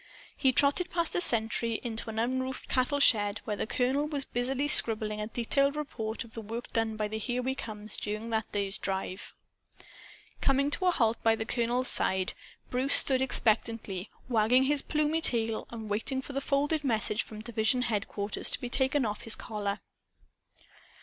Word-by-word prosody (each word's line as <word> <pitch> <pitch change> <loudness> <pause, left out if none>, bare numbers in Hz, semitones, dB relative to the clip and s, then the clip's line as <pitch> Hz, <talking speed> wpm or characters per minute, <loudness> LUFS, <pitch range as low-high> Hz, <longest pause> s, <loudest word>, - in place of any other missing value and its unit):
He 265 - +2
trotted 285 +7 +2
past 340 -2 -1
a 360 - 0
sentry, 230 -4 0
into 230 -1 -4
an 220 - -6
unroofed 260 +3 -2
cattle 260 +3 0
shed 210 -5 +3
where 210 - -2
the 205 - -4
colonel 265 +5 0
was 285 -3 0
busily 260 +4 -2
scribbling 215 -5 +4
a 210 - -3
detailed 275 +5 0
report 225 -7 -5
of 230 -1 -17
the 225 - -6
work 225 +3 -7
done 225 -1 0
by 215 -1 -1
the 220 +1 -5
"Here 245 +3 -2
We 260 +1 -1
Comes" 215 -4 -4
during 215 +2 -4
that 220 -1 -2
day's 200 0 -2
drive. 190 0 -4 1.1
Coming 275 +1 +2
to 370 - 0
a - - +6
halt 230 -8 0
by 225 0 +3
the 220 - -5
colonel's 245 +2 -1
side, 190 -1 0 0.4
Bruce 255 +3 +3
stood 260 -2 +8
expectantly 220 -5 +2 0.2
wagging 245 +2 +3
his 285 +1 +1
plumy 305 +1 -1
tail 225 -5 +1
and 225 -2 -8
waiting 230 +6 -2
for 280 - -8
the 275 - -2
folded 290 +2 0
message 220 -4 0
from 215 -1 -9
division 235 +2 0
headquarters 205 -2 -1
to - - +1
be 245 - -5
taken 265 +1 +1
off 210 -1 -4
his 225 - +4
collar. 205 -2 -4
235 Hz, 175 wpm, -29 LUFS, 215-265 Hz, 1.1 s, stood